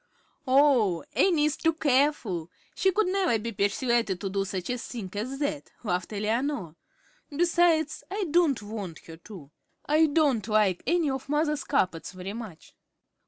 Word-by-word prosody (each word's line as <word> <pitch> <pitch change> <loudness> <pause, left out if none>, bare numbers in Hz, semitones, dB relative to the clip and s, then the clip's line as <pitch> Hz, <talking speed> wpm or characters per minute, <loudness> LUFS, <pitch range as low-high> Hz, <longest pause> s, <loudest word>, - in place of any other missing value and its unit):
"Oh, 255 - +4
Annie 335 -6 +3
is 305 0 +1
too 325 - +1
careful; 265 - +1 0.2
she 380 - +2
could 430 +3 +2
never 370 -8 +1
be 230 +2 -5
persuaded 205 0 0
to 195 - -3
do 195 0 0
such 185 +2 -4
a 250 - -1
thing 225 -5 -7
as 240 +7 -4
that," 285 0 -3
laughed 180 -3 -2
Eleanor. 215 - -2 0.5
"Besides, 325 -1 +2
I 400 +2 -2
don't 310 -9 +3
want 205 -6 -7
her 165 -1 -10
to. 170 -5 -12 0.3
I 310 +2 +4
don't 285 -8 +1
like 210 -4 +2
any 335 -4 +2
of 265 0 -5
mother's 295 -1 0
carpets 185 - -1
very 185 +2 -6
much." 220 -8 -9
250 Hz, 155 wpm, -27 LUFS, 200-300 Hz, 0.5 s, Oh